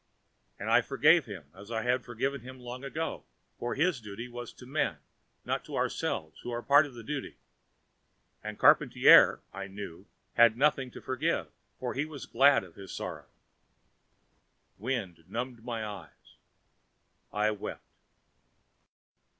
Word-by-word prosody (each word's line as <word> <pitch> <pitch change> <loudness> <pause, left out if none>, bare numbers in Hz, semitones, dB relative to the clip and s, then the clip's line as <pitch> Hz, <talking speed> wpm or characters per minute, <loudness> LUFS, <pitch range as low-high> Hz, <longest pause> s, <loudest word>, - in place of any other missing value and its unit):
And - - -6
I - - +6
forgave 165 -4 +4
him, 85 -9 -9
as 100 +3 -13
I 110 -1 -2
had 125 +1 +1
forgiven 130 +3 -2
him 130 +2 -10
long 125 +1 -8
ago. 155 +4 -4 0.4
For 120 - -2
his 155 -2 +1
duty 105 +3 -7
was 120 -1 -7
to 125 - -13
men, 140 +5 -1 0.5
not - - -1
to - - -7
ourselves 80 0 -2
who - - -7
were 120 0 -3
part 145 +2 +6
of 135 - -13
that 115 - -9
duty. 135 - -5 1.1
And 105 0 -6
Charpantier, - - +7
I 100 0 -5
knew, 100 -4 -9 0.3
had 115 -1 +6
nothing 135 -2 +2
to - - -11
forgive, 130 -1 -1 0.3
for 125 -1 -3
he 140 +3 -1
was 155 -3 -8
glad 135 +1 +5
of 90 -3 -13
his 95 0 -10
sorrow. - - -6 1.5
The - - -19
wind 100 -10 -2
numbed 120 -1 -5
my 115 -2 -3
eyes. 100 -6 -10 1.0
I 105 +1 +1
wept. 105 - -6
120 Hz, 150 wpm, -30 LUFS, 105-135 Hz, 1.5 s, Charpantier